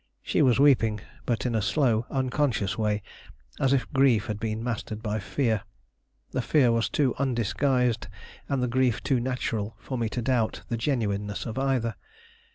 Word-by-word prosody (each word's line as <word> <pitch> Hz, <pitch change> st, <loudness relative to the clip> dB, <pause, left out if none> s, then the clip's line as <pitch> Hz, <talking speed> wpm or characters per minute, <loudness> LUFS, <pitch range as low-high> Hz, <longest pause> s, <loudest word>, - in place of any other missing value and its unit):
She -, -, +1 dB
was 125 Hz, -1 st, +4 dB
weeping, 115 Hz, -7 st, +4 dB, 0.3 s
but 115 Hz, -3 st, 0 dB
in 125 Hz, -, 0 dB
a 110 Hz, -, +1 dB
slow, 115 Hz, +1 st, +1 dB
unconscious 130 Hz, -6 st, 0 dB
way, 105 Hz, -2 st, 0 dB, 0.6 s
as 135 Hz, -, +2 dB
if 135 Hz, -2 st, +2 dB
grief 130 Hz, -6 st, +4 dB
had 105 Hz, -1 st, -4 dB
been 110 Hz, 0 st, -3 dB
mastered 110 Hz, -2 st, -4 dB
by 110 Hz, -1 st, -1 dB
fear. 110 Hz, 0 st, 0 dB, 0.7 s
The -, -, -1 dB
fear 130 Hz, -6 st, +3 dB
was 115 Hz, 0 st, +1 dB
too 135 Hz, -4 st, +1 dB
undisguised 125 Hz, -2 st, +1 dB, 0.4 s
and 135 Hz, -3 st, 0 dB
the -, -, +1 dB
grief 125 Hz, -1 st, +1 dB
too 130 Hz, -3 st, +2 dB
natural 115 Hz, -4 st, -2 dB
for 130 Hz, +1 st, -5 dB
me 115 Hz, -2 st, 0 dB
to 120 Hz, +1 st, -3 dB
doubt 120 Hz, -3 st, 0 dB
the 120 Hz, -, 0 dB
genuineness 105 Hz, -6 st, -1 dB
of 115 Hz, +2 st, -4 dB
either. 130 Hz, -4 st, 0 dB
120 Hz, 165 wpm, -27 LUFS, 110-130 Hz, 0.7 s, was